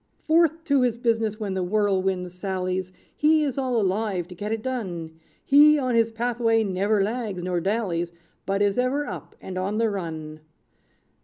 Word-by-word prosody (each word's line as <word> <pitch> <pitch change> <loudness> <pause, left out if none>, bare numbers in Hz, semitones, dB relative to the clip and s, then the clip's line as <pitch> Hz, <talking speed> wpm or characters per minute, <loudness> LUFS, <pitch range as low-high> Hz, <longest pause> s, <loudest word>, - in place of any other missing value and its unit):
"Forth 325 0 +3
to 280 -4 +2
his 245 -2 +1
business 225 -3 0
when 205 -3 -3
the 190 - -1
Whirlwind 190 -2 0
sallies, 185 0 -3 0.2
He 310 +1 +4
is 275 -4 -1
all 255 -3 0
alive 195 -3 -1
to - - -8
get 205 +4 -5
it 225 -1 -2
done; 175 -11 -4 0.3
He 300 +2 +7
on 255 -3 0
his 230 -1 +3
pathway 230 -1 +1
never 200 +1 +1
lags 210 -4 -3
nor 180 -1 0
dallies; 185 -4 -1 0.4
But 195 +1 +1
is 205 +3 +1
ever 270 +4 +1
up, - - -8
and 185 -1 -6
on 200 +3 -2
the 225 -1 +2
run. 160 -5 -5
210 Hz, 170 wpm, -25 LUFS, 185-245 Hz, 0.4 s, He